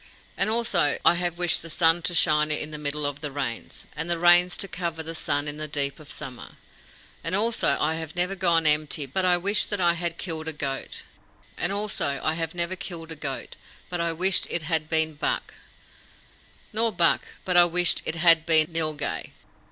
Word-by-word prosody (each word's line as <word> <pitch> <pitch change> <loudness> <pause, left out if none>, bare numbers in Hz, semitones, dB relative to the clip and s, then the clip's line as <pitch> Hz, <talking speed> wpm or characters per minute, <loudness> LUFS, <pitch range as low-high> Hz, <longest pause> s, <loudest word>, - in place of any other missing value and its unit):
And - - 0
also 210 -10 +2
I - - +7
have 175 -1 -2
wished 175 -1 +1
the 165 - -10
sun 165 +1 +3
to 175 - -5
shine 155 -2 +3
in 150 0 -1
the 150 - -7
middle 150 0 -1
of 145 0 -4
the 150 - -3
Rains, 135 -5 -5
and 160 +2 -3
the 170 - +1
Rains 175 +1 +5
to 195 - -3
cover 170 -3 -5
the 165 +1 -6
sun 145 -2 -1
in 145 0 -4
the 155 0 -3
deep 140 -1 -1
of 150 -2 -14
summer; 130 -5 -7 0.7
and 165 +3 0
also 215 -8 +2
I 160 - +1
have 160 0 -7
never 180 +2 0
gone 170 -4 +2
empty 150 -1 +2
but 185 +8 -2
I 180 -1 +4
wished 200 +3 0
that 205 - -2
I 175 -2 +3
had 170 0 -4
killed 160 -3 -4
a 160 - -2
goat; 135 -2 -5 0.5
and 175 - 0
also 200 -9 0
I 155 - +2
have 165 +1 -4
never 170 +1 -1
killed 165 -3 -8
a - - -5
goat 135 -3 -6 0.3
but 175 -1 -2
I 170 0 0
wished 180 +3 +2
it 170 - -1
had 160 -1 -1
been 160 -1 +2
buck; 145 - -3 1.2
nor 225 +1 +2
buck 175 -4 +3 0.2
but 180 - -1
I 175 0 +8
wished 175 0 +2
it 160 - -3
had 165 -1 +4
been 160 -1 +3
nilghai. 155 -2 -2
165 Hz, 205 wpm, -25 LUFS, 150-175 Hz, 1.2 s, I